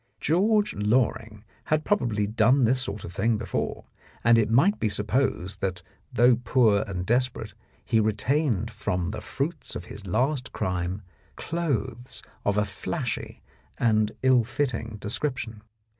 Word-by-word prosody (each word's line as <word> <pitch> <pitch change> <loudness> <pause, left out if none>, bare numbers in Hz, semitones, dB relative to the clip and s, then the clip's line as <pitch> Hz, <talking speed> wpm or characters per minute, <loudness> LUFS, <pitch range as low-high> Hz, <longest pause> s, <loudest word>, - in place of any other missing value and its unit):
George 205 +6 +2
Loring 105 0 0 0.2
had 155 0 +1
probably 115 - +1
done 115 +5 +3
this 125 +3 +3
sort 105 -6 -5
of 85 - -9
thing 110 +4 +1
before, - - -3 0.4
and 120 0 +6
it 110 - +1
might 140 - +4
be 110 - +1
supposed 105 -3 -1
that 90 -3 -2 0.3
though 120 0 +5
poor 115 -4 +3
and 90 -2 -4
desperate, 120 -2 0 0.3
he 115 -3 +2
retained 110 - +1
from 90 -4 -2
the 110 - -6
fruits 150 +3 -4
of 85 - -5
his 100 +1 -10
last 130 - 0
crime 90 +2 -2 0.3
clothes 135 -7 -3 0.2
of 100 0 +1
a 105 - +3
flashy 95 -2 -4 0.3
and 110 -2 +2
ill 130 -2 +5
fitting 115 -3 -2
description. 115 0 -3
115 Hz, 140 wpm, -26 LUFS, 105-130 Hz, 0.4 s, and